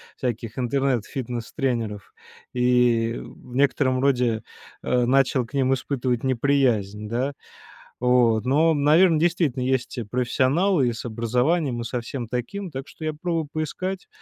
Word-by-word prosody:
всяких 120 -3 -4
интернет-фитнес-тренеров 125 - -2 0.4
и 125 -2 +2
в 125 - -13
некотором 135 -1 +2
роде, 125 -5 +1 0.4
а, 125 -1 +1
начал 130 0 +2
к 115 - -20
ним 135 -1 +2
испытывать 125 -2 -1
неприязнь. 120 -6 +1
Да? 130 +5 -1 0.7
Вот. 120 -3 +3
Но, 155 +5 +3
наверно, 155 +3 +4
действительно 165 -6 +1
есть 130 0 -1
и 120 - -2
профессионалы, 130 - +1
и - - -2
с 115 - -7
образованием, 125 +4 0
и - - -3
со 120 +1 -3
всем 120 0 -5
таким, 180 - -4
так 135 -2 -7
что - - -12
я 155 - 0
попробую 165 0 -2
поискать, 185 +5 -4
130 Hz, 135 wpm, -24 LUFS, 120-145 Hz, 0.7 s, наверно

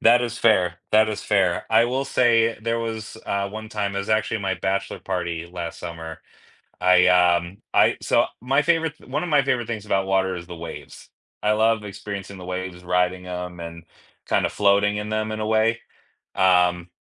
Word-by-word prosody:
That 120 +1 +6
is 120 -1 -3
fair 90 -8 +3 0.2
that 110 0 +5
is 105 - -4
fair, 95 -4 +1
I 115 +1 +5
will 130 +3 -1
say 115 -4 +2
there 115 +1 0
was, 110 -1 -5
uh, 100 0 -1
one 110 +2 -8
time, 100 -2 -2
it - - -1
was 100 +2 -4
actually 110 0 +1
my 95 -1 -1
bachelor 95 +1 -2
party 85 -3 -4
last 85 -2 -6
summer, 80 -2 -7 0.6
I, 90 0 +5
um 90 0 +3 0.2
I - - +4
so, - - +3
my 135 +5 +2
favorite 165 -1 +1
one 145 +4 -2
of 180 - -3
my 145 -3 +4
favorite 125 -4 0
things 110 -3 -5
about 95 -2 +1
water 95 -1 +1
is 85 -1 -8
the 85 -1 -9
waves. 85 0 -9 0.3
I 105 - +3
love 110 0 +2
experiencing 100 -1 -7
the 90 - -9
waves, 90 -1 -5
riding 90 +1 0
'em, 90 -1 -6
and 85 0 -8 0.4
kind - - +2
of - - -5
floating 105 0 +3
in 105 0 -4
them 110 0 -1
in 110 - -4
a 110 - -2
way. 110 +1 +2 0.6
Um, 90 -2 +3
100 Hz, 195 wpm, -23 LUFS, 90-110 Hz, 0.6 s, That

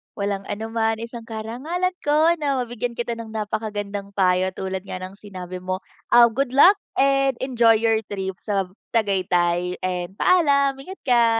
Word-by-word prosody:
Walang 200 -1 -3
anuman, 225 +1 -1
isang 230 0 -8
karangalan 255 +12 -3
ko 305 +3 +3
na 285 -2 0
mabigyan 240 0 -4
kita 235 -1 -3
ng 225 -1 -8
napakagandang 205 -2 -4
payo 185 -1 +2
tulad 190 0 -4
nga 185 - -6
ng 190 +1 -8
sinabi 185 -3 -8
mo, 185 +3 -4 0.3
ah, 240 0 +8
good 260 +2 -1
luck 375 +9 +7 0.2
and 275 -1 +3
enjoy 235 -3 +4
your 225 0 +2
trip 190 -2 -4
sa 200 -2 -1
b - - -23 0.2
Tagaytay 180 -4 +1
and 180 0 -3
paalam! 280 -6 +3
Ingat 375 +8 -10
ka. 240 -2 +5
220 Hz, 160 wpm, -23 LUFS, 190-250 Hz, 0.3 s, ah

